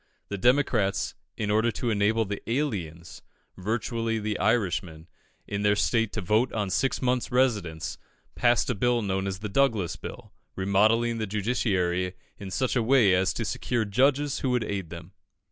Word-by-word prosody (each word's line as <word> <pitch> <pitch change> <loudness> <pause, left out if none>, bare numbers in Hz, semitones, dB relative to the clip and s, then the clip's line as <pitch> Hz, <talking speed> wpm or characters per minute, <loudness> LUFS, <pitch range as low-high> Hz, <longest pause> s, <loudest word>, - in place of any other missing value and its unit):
The 100 - -3
Democrats, 120 -5 +2 0.2
in 105 -1 -1
order 110 +2 +3
to 115 +3 -2
enable 110 +2 +2
the 100 0 -5
aliens 95 - -3 0.3
virtually 115 +3 -2
the 105 -1 -2
Irishmen 90 -6 0 0.4
in 100 0 -3
their 105 0 +3
state 115 0 +1
to 110 - -2
vote 110 +7 +2
on 105 -3 -2
six 135 +6 0
months' 125 -1 0
residence, 105 -11 0 0.3
passed 120 +1 +2
a - - +1
Bill 120 +2 +1
known 95 -1 -1
as 95 -1 -4
the 105 - -3
Douglas 110 -5 +1
Bill, - - -9 0.2
remodelling 110 +5 +2
the 110 - -2
judiciary 95 -4 0 0.2
in 100 -2 -7
such 130 +7 -1
a 125 - +3
way 115 -4 +4
as 95 +1 +2
to - - -3
secure 120 -3 -1
judges 135 +7 +2
who 130 - -1
would 125 -2 +1
aid 100 -5 -4
them. 85 +1 -9
105 Hz, 165 wpm, -27 LUFS, 95-120 Hz, 0.4 s, way